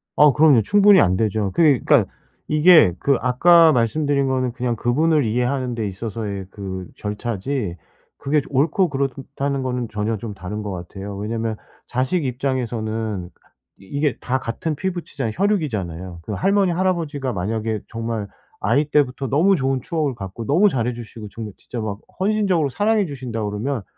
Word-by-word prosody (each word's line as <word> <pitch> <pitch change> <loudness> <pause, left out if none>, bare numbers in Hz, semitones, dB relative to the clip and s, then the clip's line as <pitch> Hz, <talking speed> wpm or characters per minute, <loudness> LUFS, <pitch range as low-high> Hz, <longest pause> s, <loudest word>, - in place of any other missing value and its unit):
아 150 -1 +7
그럼요. 150 -4 +5
충분히 205 - +5
안 90 0 +3
되죠. 105 -2 0
그게 150 -7 +4
그러니까 - - +3 0.4
이게 155 - +6
그 140 -2 +2
아까 165 +7 +5
말씀드린 140 +3 +1
거는 130 -2 0
그냥 120 -1 -2
그분을 150 +6 +2
이해하는 125 +2 -1
데 110 -3 -2
있어서의 100 0 -5
그 95 -3 -6
절차지 105 0 -3 0.4
그게 150 +2 +1
저 - - -14
옳고 160 +7 +2
그렇다는 140 0 -2
거는 125 -2 -2
전혀 105 +1 -2
좀 105 +1 -6
다른 100 +3 -6
것 105 - -4
같아요. 95 +3 -7
왜냐하면 110 +2 -2 0.3
자식 130 +7 0
입장에서는 115 -7 -2 0.5
이게 140 +8 -2
다 130 +1 -1
같은 130 +6 -3
피붙이잖아요, 155 - -3
혈육이잖아요. 95 - -2
그 105 - -5
할머니, 195 - +2
할아버지가 165 -7 -1
만약에 110 +3 -2
정말 115 -2 -4 0.3
아이 145 +2 +2
때부터 140 -2 +1
너무 170 +9 +3
좋은 135 -4 0
추억을 150 -5 -1
갖고 100 +1 -7
너무 175 +9 +5
잘해 125 - 0
주시고 115 -2 -9
정말 105 -1 -7
진짜 120 - -7
막 105 -2 -4 0.2
헌신적으로 190 -6 +1
사랑해 210 - +1
주신다 125 -7 -5
그러면 105 +4 -2
125 Hz, 370 characters per minute, -21 LUFS, 110-150 Hz, 0.5 s, 아